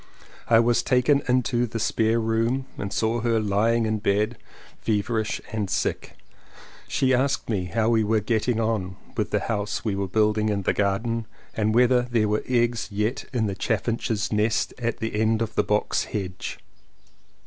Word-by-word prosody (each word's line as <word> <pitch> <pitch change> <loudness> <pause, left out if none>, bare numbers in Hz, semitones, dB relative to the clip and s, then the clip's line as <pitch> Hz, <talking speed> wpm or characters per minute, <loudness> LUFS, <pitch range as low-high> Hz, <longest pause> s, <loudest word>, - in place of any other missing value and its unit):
I 115 -1 +6
was 120 0 +3
taken 125 +3 +3
into 125 -1 +1
the 115 - -5
spare 110 +1 +1
room 115 +4 0
and 100 - -5
saw 115 +1 0
her 115 -1 +2
lying 110 +3 +2
in 110 0 0
bed, 105 +2 0 0.4
feverish 110 0 -1
and 105 -3 -2
sick - - -2 0.4
— - - -25 0.3
she 130 -1 +1
asked 130 -1 +1
me 95 -4 -1
how 110 +6 0
we 115 -2 +3
were 110 +1 +2
getting 110 +2 0
on 110 -5 -1 0.2
with - - -1
the - - 0
house 105 -1 -2
we 105 -3 0
were 100 0 -2
building 105 +2 +2
in 100 -2 -1
the - - +1
garden 110 +3 -1 0.3
and 110 0 0
whether 125 +1 +5
there 120 -3 0
were 105 +1 0
eggs 120 -2 +1
yet 105 +5 -2
in 120 -4 0
the 100 - -1
chaffinch's 110 +1 -1
nest 110 +2 +1
at 115 -1 -1
the 110 -1 -2
end 110 0 +2
of 115 -1 -2
the - - +2
box 105 0 0
hedge. 95 -3 -5
110 Hz, 175 wpm, -25 LUFS, 105-120 Hz, 0.4 s, I